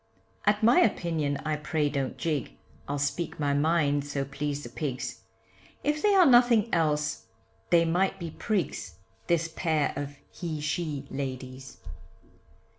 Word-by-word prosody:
At 210 Hz, +1 st, +3 dB
my 235 Hz, +4 st, +6 dB
opinion 160 Hz, -9 st, +1 dB
I 155 Hz, -1 st, 0 dB
pray 150 Hz, 0 st, 0 dB
don't 140 Hz, -2 st, -2 dB
gig, 150 Hz, -6 st, -2 dB, 0.3 s
I'll 145 Hz, -, -2 dB
speak 145 Hz, +4 st, -2 dB
my 145 Hz, -1 st, +1 dB
mind 145 Hz, -1 st, +2 dB
so 140 Hz, -1 st, -3 dB
please 145 Hz, +1 st, -3 dB
the 120 Hz, -, -7 dB
pigs, 130 Hz, +1 st, -4 dB, 0.6 s
If 300 Hz, +1 st, 0 dB
they 415 Hz, -1 st, +4 dB
are 370 Hz, -2 st, +7 dB
nothing 240 Hz, -4 st, +5 dB
else, 150 Hz, -6 st, 0 dB, 0.4 s
they 170 Hz, -1 st, +5 dB
might 180 Hz, +4 st, +1 dB
be 170 Hz, -2 st, -5 dB
prigs 170 Hz, -, -2 dB, 0.3 s
This 170 Hz, -1 st, +2 dB
pair 160 Hz, -2 st, 0 dB
of 145 Hz, 0 st, -5 dB, 0.2 s
he 165 Hz, -4 st, -4 dB
she 150 Hz, -2 st, -2 dB
ladies. 130 Hz, -1 st, -6 dB
150 Hz, 140 wpm, -28 LUFS, 140-175 Hz, 0.6 s, are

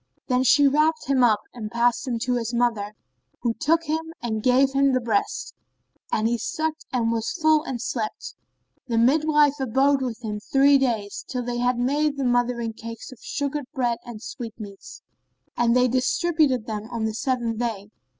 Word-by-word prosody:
Then 250 Hz, 0 st, +3 dB
she 285 Hz, +3 st, +5 dB
wrapped 310 Hz, +3 st, +2 dB
him 270 Hz, -2 st, +2 dB
up 215 Hz, -3 st, +4 dB
and 220 Hz, -3 st, -6 dB
passed 235 Hz, +4 st, +1 dB
him 240 Hz, -2 st, -1 dB
to 250 Hz, -, 0 dB
his 240 Hz, -1 st, -2 dB
mother, 220 Hz, -4 st, 0 dB, 0.5 s
who 235 Hz, -2 st, 0 dB
took 325 Hz, +7 st, +1 dB
him 320 Hz, +1 st, -3 dB
and 220 Hz, -2 st, -3 dB
gave 260 Hz, +3 st, +4 dB
him 275 Hz, 0 st, +3 dB
the 255 Hz, -, +3 dB
breast; 235 Hz, -, -1 dB, 0.6 s
and 220 Hz, +1 st, +1 dB
he 235 Hz, 0 st, 0 dB
sucked 315 Hz, +6 st, -3 dB
and 235 Hz, -3 st, +1 dB
was 230 Hz, -1 st, -1 dB
full 315 Hz, -1 st, +4 dB
and 250 Hz, -3 st, -4 dB
slept. 225 Hz, -2 st, -4 dB, 0.5 s
The 230 Hz, -2 st, -1 dB
midwife 295 Hz, +3 st, +3 dB
abode 270 Hz, +2 st, +2 dB
with 245 Hz, -3 st, -4 dB
them 210 Hz, -2 st, -4 dB
three 275 Hz, +5 st, +4 dB
days, 225 Hz, -6 st, -1 dB
till 250 Hz, -1 st, -3 dB
they 240 Hz, 0 st, -3 dB
had 245 Hz, 0 st, +1 dB
made 285 Hz, +4 st, +1 dB
the 275 Hz, -, -1 dB
mothering 245 Hz, -2 st, 0 dB
cakes 230 Hz, +3 st, -9 dB
of 255 Hz, -, -13 dB
sugared 285 Hz, -1 st, -3 dB
bread 240 Hz, -3 st, 0 dB
and 235 Hz, -3 st, -9 dB
sweetmeats; 220 Hz, -6 st, -9 dB, 0.5 s
and 235 Hz, 0 st, +2 dB
they 250 Hz, 0 st, +4 dB
distributed 260 Hz, 0 st, +1 dB
them 215 Hz, 0 st, -5 dB
on 230 Hz, -2 st, -2 dB
the 220 Hz, -, -2 dB
seventh 235 Hz, -1 st, -1 dB
day. 215 Hz, -4 st, -3 dB
245 Hz, 180 wpm, -24 LUFS, 230-275 Hz, 0.6 s, she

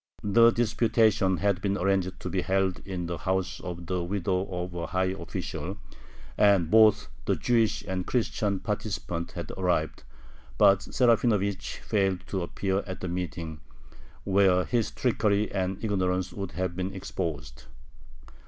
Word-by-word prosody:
The 115 Hz, +3 st, +6 dB
disputation 110 Hz, -4 st, +2 dB
had 100 Hz, -2 st, +1 dB
been 100 Hz, -1 st, 0 dB
arranged 95 Hz, -1 st, 0 dB
to -, -, -5 dB
be 95 Hz, +1 st, 0 dB
held 95 Hz, 0 st, 0 dB
in 90 Hz, -3 st, -3 dB
the 85 Hz, -1 st, -4 dB
house 95 Hz, -1 st, -1 dB
of 90 Hz, -1 st, -6 dB
the 90 Hz, +1 st, -1 dB
widow 95 Hz, +1 st, -1 dB
of 90 Hz, -1 st, -4 dB
a 85 Hz, -1 st, -4 dB
high 95 Hz, 0 st, 0 dB
official, 85 Hz, -3 st, -5 dB, 0.6 s
and 100 Hz, -6 st, +4 dB
both 110 Hz, -1 st, +6 dB, 0.2 s
the -, -, +2 dB
Jewish 115 Hz, -3 st, +1 dB
and 95 Hz, -1 st, -3 dB
Christian 105 Hz, -5 st, 0 dB
participants 100 Hz, -5 st, -3 dB
had 85 Hz, -4 st, -6 dB
arrived, 90 Hz, -4 st, 0 dB, 0.6 s
but 100 Hz, 0 st, +6 dB
Serafinovich 110 Hz, -6 st, +1 dB
failed 95 Hz, -3 st, +1 dB
to 95 Hz, -, -2 dB
appear 95 Hz, +2 st, -1 dB
at 95 Hz, -, -6 dB
the 90 Hz, -, -3 dB
meeting, 85 Hz, -3 st, -4 dB, 0.6 s
where 95 Hz, -2 st, +3 dB
his 120 Hz, -3 st, 0 dB
trickery 105 Hz, -4 st, +1 dB
and 95 Hz, -1 st, -1 dB
ignorance 95 Hz, -3 st, 0 dB
would 95 Hz, -4 st, -5 dB
have 90 Hz, +1 st, -2 dB
been 95 Hz, +2 st, -3 dB
exposed. 75 Hz, -8 st, -5 dB
95 Hz, 145 wpm, -27 LUFS, 90-105 Hz, 0.6 s, The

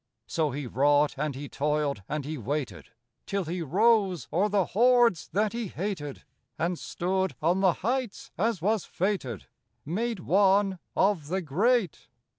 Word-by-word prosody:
So 160 Hz, -2 st, 0 dB
he 145 Hz, +1 st, -4 dB
wrought 145 Hz, +4 st, +3 dB
and 150 Hz, -1 st, -2 dB
he 145 Hz, +2 st, -6 dB
toiled 145 Hz, -5 st, -1 dB
and 150 Hz, -2 st, -3 dB
he 155 Hz, +2 st, -4 dB
waited, 140 Hz, +2 st, -4 dB, 0.4 s
Till 200 Hz, -1 st, -1 dB
he 175 Hz, +3 st, -3 dB
rose 195 Hz, -, +2 dB
o'er 200 Hz, +5 st, +2 dB
the 200 Hz, -3 st, +2 dB
hordes 240 Hz, -4 st, +4 dB
that 210 Hz, +5 st, +1 dB
he 235 Hz, -2 st, -3 dB
hated, 170 Hz, -6 st, -5 dB, 0.3 s
And 170 Hz, +1 st, -1 dB
stood 190 Hz, -3 st, -1 dB
on 175 Hz, +4 st, +2 dB
the 190 Hz, -3 st, +4 dB
heights, 250 Hz, -2 st, -2 dB
as 210 Hz, -3 st, -1 dB
was 215 Hz, 0 st, +1 dB
fated, 175 Hz, -, -2 dB, 0.4 s
Made 215 Hz, +6 st, -2 dB
one 195 Hz, +1 st, +3 dB, 0.2 s
of 190 Hz, -6 st, +2 dB
the 185 Hz, +3 st, -2 dB
great. 195 Hz, -, +1 dB
180 Hz, 150 wpm, -28 LUFS, 150-205 Hz, 0.4 s, hordes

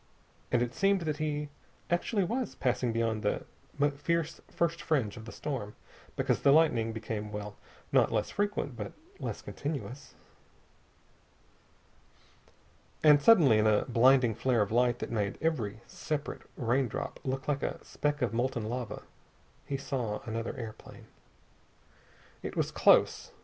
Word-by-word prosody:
And 120 Hz, -, +3 dB
it 120 Hz, 0 st, -4 dB
seemed 195 Hz, -1 st, +2 dB
that 155 Hz, -3 st, -2 dB
he 150 Hz, -1 st, -2 dB, 0.4 s
actually 195 Hz, +4 st, +1 dB
was 240 Hz, +7 st, -2 dB
passing 125 Hz, -2 st, 0 dB
beyond 115 Hz, -1 st, 0 dB
the 105 Hz, -, -1 dB, 0.5 s
first 165 Hz, +1 st, -1 dB
fierce 170 Hz, -1 st, 0 dB
fringe 135 Hz, -12 st, 0 dB
of 110 Hz, -2 st, -9 dB
the 115 Hz, -, -8 dB
storm, 120 Hz, -8 st, -4 dB, 0.4 s
because -, -, +1 dB
the 140 Hz, -, +5 dB
lightning 140 Hz, -8 st, +4 dB
became 110 Hz, -1 st, -4 dB
well, 105 Hz, 0 st, -6 dB, 0.4 s
not -, -, +4 dB
less 110 Hz, -2 st, 0 dB
frequent, 205 Hz, -10 st, -1 dB
but 105 Hz, -3 st, -6 dB, 0.3 s
less -, -, -4 dB
continuous. 140 Hz, -2 st, -5 dB, 2.9 s
And 150 Hz, -2 st, +7 dB
suddenly, 145 Hz, -, +6 dB
in 110 Hz, -, +3 dB
a 105 Hz, -1 st, +3 dB
blinding 125 Hz, 0 st, +5 dB
flare 120 Hz, 0 st, +2 dB
of 100 Hz, -, -6 dB
light 120 Hz, +1 st, +3 dB
that -, -, -5 dB
made 105 Hz, -3 st, -1 dB
every 115 Hz, -10 st, -1 dB
separate 150 Hz, +5 st, -4 dB, 0.2 s
raindrop 125 Hz, -1 st, -1 dB
look 130 Hz, 0 st, -3 dB
like 140 Hz, -2 st, 0 dB
a -, -, -2 dB
speck 145 Hz, -2 st, -1 dB
of 120 Hz, -, 0 dB
molten 120 Hz, 0 st, 0 dB
metal, 120 Hz, -2 st, -4 dB, 0.6 s
he 140 Hz, -, -1 dB
saw 125 Hz, -6 st, -3 dB
another 115 Hz, +1 st, -4 dB
airplane. 110 Hz, -2 st, -9 dB, 1.4 s
It -, -, -6 dB
was -, -, 0 dB
close. -, -, +4 dB
125 Hz, 140 wpm, -30 LUFS, 115-150 Hz, 2.9 s, And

